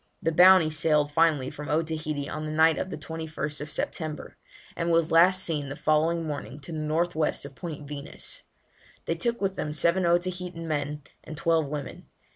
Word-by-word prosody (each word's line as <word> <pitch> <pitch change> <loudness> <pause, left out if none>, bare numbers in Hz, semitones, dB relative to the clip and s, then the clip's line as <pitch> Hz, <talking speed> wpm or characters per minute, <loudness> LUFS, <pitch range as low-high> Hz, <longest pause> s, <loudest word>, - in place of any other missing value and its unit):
The 165 - 0
Bounty 180 -1 +7
sailed 150 -1 +2
finally 150 -4 +2
from 150 -1 -8
Otaheite 155 -2 -1
on 155 0 -4
the - - -4
night 160 +1 +4
of - - -3
the - - -5
21st 155 -1 -5
September, 155 -1 -4 0.4
and 170 0 -1
was 165 0 +2
last 185 +3 +5
seen 150 -4 -2
the 135 - -5
following 160 +2 +1
morning 145 -1 -5
to 170 - -8
the 160 - -4
north 160 +3 0
west 155 -2 0
of 140 - -9
Point 150 -2 -7
Venus. 145 0 -6 0.6
They - - 0
took 235 +8 -1
with 195 -1 -1
them 150 - -3
seven 170 +4 +2
Otaheitan 175 -1 -1
men 150 -1 -2 0.2
and 155 - -9
twelve 165 -1 +2
women. 145 -1 -6
155 Hz, 180 wpm, -27 LUFS, 150-170 Hz, 0.6 s, Bounty